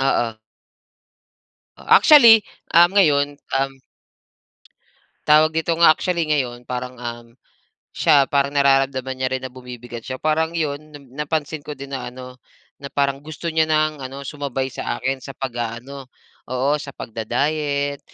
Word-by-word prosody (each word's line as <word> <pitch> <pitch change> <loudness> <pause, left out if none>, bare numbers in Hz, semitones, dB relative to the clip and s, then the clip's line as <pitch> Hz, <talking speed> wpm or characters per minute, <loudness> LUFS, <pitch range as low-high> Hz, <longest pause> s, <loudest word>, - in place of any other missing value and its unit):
Oo. 115 -4 0 1.4
Actually, 235 -8 +7 0.3
ah, 170 +1 +7
ngayon, 145 -7 +2 0.2
um. 135 0 -1 1.5
Tawag 155 +1 +5
dito 160 +1 -1
nga, 165 -1 +6
actually 170 0 -1
ngayon, 125 -4 -1
parang, 125 0 -5
um, 120 -1 -7 0.7
siya 140 -2 +4
parang 140 0 +1
nararamdaman 135 -2 +2
niya 130 0 -1
rin - - -12
na 130 - -6
bumibigat 125 -2 -9
siya. 130 0 -6
Parang, 160 +1 0
'yon 155 -4 -1 0.2
na 145 - -10 0.3
napansin 155 0 -3
ko 150 - -5
din 140 -1 -10
na 130 - -4
ano, 125 0 -11 0.4
na 140 - -9
parang 140 -1 +1
gusto 155 +2 -5
niya 160 0 +2
nang 155 -1 +1
ano, 135 +1 -7
sumabay 140 -2 -4
sa - - -4
akin 135 +1 -1
sa 135 +1 -10
pag-aano 125 +2 -6 0.4
Oo, 130 +4 0
sa 140 -2 -8
pagda-diet, 140 +5 -2
140 Hz, 140 wpm, -21 LUFS, 130-155 Hz, 1.5 s, Actually